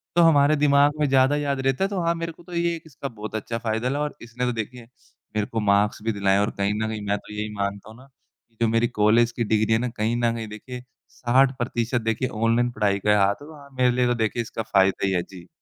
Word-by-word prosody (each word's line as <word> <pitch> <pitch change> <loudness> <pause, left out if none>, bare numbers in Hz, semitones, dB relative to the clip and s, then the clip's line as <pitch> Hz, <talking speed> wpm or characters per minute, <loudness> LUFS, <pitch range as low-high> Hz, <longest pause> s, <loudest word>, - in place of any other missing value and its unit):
तो 175 - +5
हमारे 155 -2 +5
दिमाग 145 0 +4
में 150 - +2
ज़्यादा 135 +1 +4
याद 140 -2 -1
रहता 135 +7 +1
है, - - +2
तो 195 -3 -2
हाँ, 170 0 +1
मेरे 165 0 -4
को 165 - -18
तो 175 +1 -12
ये 170 0 0
एक 165 - -10
इसका 140 -2 -7
बहुत 110 -3 -8
अच्छा 115 +2 -3
फ़ायदा 115 +1 -1
लगा 140 +2 -1
और 150 - -4
इसने 120 +2 -4
तो 125 - +1
देखिए 115 +2 -6 0.5
मेरे 105 -1 +1
को 115 - -1
मार्क्स 105 0 +2
भी 115 - 0
दिलाएँ 100 -1 +2
है - - +3
और 105 - +1
कहीं 100 +1 0
न - - -1
कहीं 110 -1 -4
मैं 100 +1 +1
तो 105 - -12
यही 105 +1 -3
मानता 100 +1 -3
हूँ 110 - -13
ना, 130 +2 -16 0.4
कि 115 - -36
जो 115 - +4
मेरी 115 +1 +2
कॉलेज 115 +3 +4
की 115 0 -2
डिग्री 110 0 +1
है 110 - +3
ना, 125 +1 -2
कहीं 115 0 -1
न 115 -1 +2
कहीं 115 -1 -5
देखिए 125 +4 -9 0.3
60% 120 -1 +1
देखिए 115 +3 -1
ऑनलाइन 115 +2 +1
पढ़ाई 105 -3 0
का 105 - -1
ही - - +5
हाथ 100 -1 +4
है, 145 - -11
तो 160 - -11
हाँ, 140 -1 -14
मेरे 125 -1 +4
लिए 125 0 +1
तो 120 - +2
देखिए 115 +1 -1
इसका 115 -1 -5
फ़ायदा 95 -2 +2
ही - - 0
है। 90 - +1
जी। 90 -2 -13
115 Hz, 275 wpm, -24 LUFS, 105-135 Hz, 0.5 s, तो